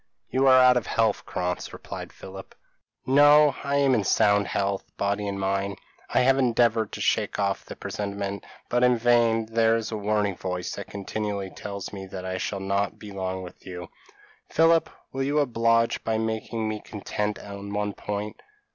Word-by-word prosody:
p> - - -2
"You 135 - +4
are 130 -1 +8
out 125 -1 +6
of 120 - -2
health, 110 -2 +1
Krantz," 90 -1 -3
replied - - -8
Philip. 95 0 -11 0.5
"No, 145 +1 +6
I 140 0 -1
am 140 -2 +4
in 110 -5 +2
sound 100 +1 +3
health, 100 0 -1
body 100 +1 -1
and 100 0 -3
mind. 100 0 -1 0.3
I - - +3
have 135 +1 +4
endeavoured 115 -3 +2
to - - -5
shake - - +1
off 100 -1 0
the - - -9
presentiment, 100 -1 -4 0.2
but 120 +1 +1
in 125 -1 +5
vain; 115 -1 +3
there 115 0 +2
is 115 0 -3
a 110 - -2
warning 105 -1 0
voice 90 0 -4
that - - -7
continually 100 -1 -4
tells 100 -1 -7
me 95 -1 -7
that 95 0 -7
I 95 0 -3
shall 100 - -3
not 100 +1 -1
be 105 - -10
long 95 -1 -4
with 90 - -12
you. 90 -2 -7 0.6
Philip, 165 0 +4 0.2
will 135 - -2
you 140 +2 0
oblige 115 -4 +2
me - - -35
by 110 -1 0
making 110 0 -2
me 110 0 -3
content 105 0 -3
on 100 0 -8
one 105 0 -1
point? 105 +2 -5
105 Hz, 185 wpm, -26 LUFS, 100-120 Hz, 0.6 s, are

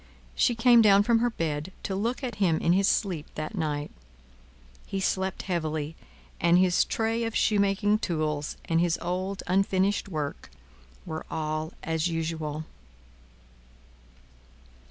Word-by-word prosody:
She 240 - +2
came 235 0 +6
down 200 -2 +6
from 230 +1 +3
her 240 +1 +2
bed, 160 -4 -3
to 195 - -3
look 235 +7 -2
at 240 -5 -4
him 170 -5 +3
in 170 - +2
his 195 +1 +3
sleep 175 -8 0
that 155 +4 -4
night. 150 -6 -2 1.0
He 195 - -3
slept 190 0 -1
heavily, 155 -3 -2 0.4
and 170 +1 +4
his 180 -1 +4
tray 225 +1 -1
of 225 0 -3
shoemaking 205 0 +2
tools, 155 -6 -2
and 165 0 +2
his 175 -1 +1
old 185 +3 -3
unfinished 195 +2 +1
work, 150 -5 -4 0.6
were 160 0 -5
all 155 +1 -3
as 160 +1 0
usual. 160 -2 -3
180 Hz, 135 wpm, -27 LUFS, 160-200 Hz, 1.0 s, came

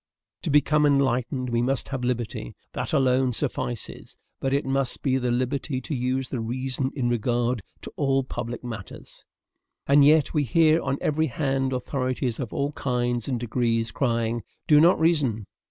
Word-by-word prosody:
"To 170 - -3
become 150 +1 +4
enlightened, 130 -2 +1
we 120 0 +1
must 135 +2 -1
have 130 -2 -3
liberty. 120 - -3 0.2
That - - -3
alone 130 -3 +2
suffices; 120 -3 -4 0.2
but 135 - -1
it 140 +1 +1
must 135 -1 0
be 130 -2 +2
the 125 -1 -1
liberty 130 +3 -1
to 130 - -6
use 130 0 -1
the 130 - -3
reason 130 +3 -2
in 130 -4 0
regard 120 0 0 0.2
to - - -7
all 135 -1 +2
public 120 -2 -5
matters. 115 -5 -9 0.6
"And 140 +1 +6
yet 150 +1 +4
we 150 - +2
hear 160 +5 +4
on 135 - -1
every 155 +1 +1
hand 135 0 -1
authorities 130 -2 -2
of 125 -5 -4
all 140 +1 -1
kinds 120 -4 -1
and 125 -3 -1
degrees 115 -1 0
crying: 115 -3 0 0.3
'Do 150 -1 +6
not 175 +3 +5
reason!' 145 -10 +1
130 Hz, 165 wpm, -25 LUFS, 120-140 Hz, 0.6 s, And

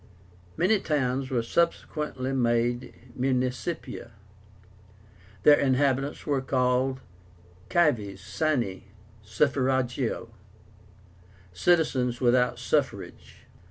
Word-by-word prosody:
Many 195 +5 +3
towns 130 -4 -1
were 120 -4 0
subsequently 150 -2 -1
made 120 0 0 0.2
MUNICIPIA. 130 +2 -2 1.3
Their 145 - +7
inhabitants 135 +1 +1
were 140 -3 0
called 130 0 0 0.7
CIVES 120 - +1
SINE 115 -3 -1 0.4
SUFFRAGIO, 130 +1 0 1.2
"citizens 130 - +1
without 125 -1 +2
suffrage." 125 -4 -3
130 Hz, 70 wpm, -27 LUFS, 120-145 Hz, 1.3 s, Their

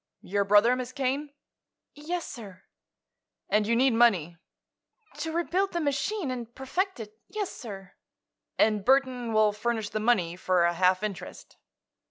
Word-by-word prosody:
"Your 200 +2 0
brother, 210 +5 +5
Miss 255 0 -5
Kane?" 275 +2 -2 0.6
"Yes, 330 +4 -4
sir." 200 -7 -10 0.9
"And 210 +1 +2
you 230 - +2
need 255 +1 +3
money?" 195 -8 +3 0.8
"To 320 - -3
rebuild 355 +4 0
the 345 - 0
machine, 295 +3 -1
and 240 -2 -6
perfect 360 +7 -2
it; 215 0 -10
yes, 410 0 -4
sir." 195 -5 -9 0.6
"And 215 -2 +3
Burthon 255 -2 +2
will 215 -1 +4
furnish 220 0 -2
the 215 - -3
money, 205 -7 +1
for 180 -1 +1
a 170 0 +3
half 185 +2 +2
interest?" 200 -4 -6
235 Hz, 145 wpm, -27 LUFS, 205-275 Hz, 0.9 s, brother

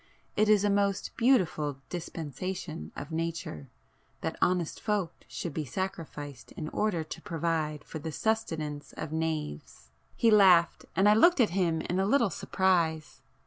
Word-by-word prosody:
It 215 +1 +3
is 210 -2 +5
a 205 - +3
most 200 -1 0
beautiful 180 - +2
dispensation 170 0 -5
of 145 - -7
nature,—that 165 - -6
honest 180 -3 +1
folk 205 -6 0
should 170 - -5
be 155 - -2
sacrificed 150 -3 -5
in 155 - -5
order 190 -5 0
to 155 - -8
provide 160 -3 -2
for 160 - -7
the 160 +2 -5
sustenance 155 -8 -2
of 155 - -6
knaves!" 150 - -4 0.2
He 230 - +4
laughed, 185 -5 +5
and 195 +2 +4
I 210 - +7
looked 340 +10 +5
at 230 -7 +4
him 170 -3 +1
in 180 - -1
a 195 - +2
little 235 -4 +3
surprise. 165 -4 0
170 Hz, 145 wpm, -29 LUFS, 155-200 Hz, 0.2 s, I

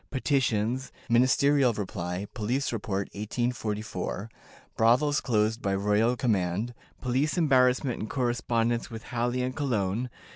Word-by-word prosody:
Petitions. 130 -2 0 0.2
Ministerial 130 +2 +4
Reply. 90 -2 -4
Police 125 +4 -1
Report, 100 -3 -2
1844. 110 -2 -3 0.4
Brothels 135 +6 +3
closed 110 -1 +1
by 100 -1 0
royal 105 +4 +2
Command. 105 -1 0 0.3
Police 135 +6 0
Embarrassment, 130 -4 +3
and 110 - -4
Correspondence 120 -2 0
with 115 -1 -8
Halle 120 +1 -1
and 130 0 -3
Cologne. 120 -4 -1
120 Hz, 110 wpm, -28 LUFS, 105-125 Hz, 0.4 s, Ministerial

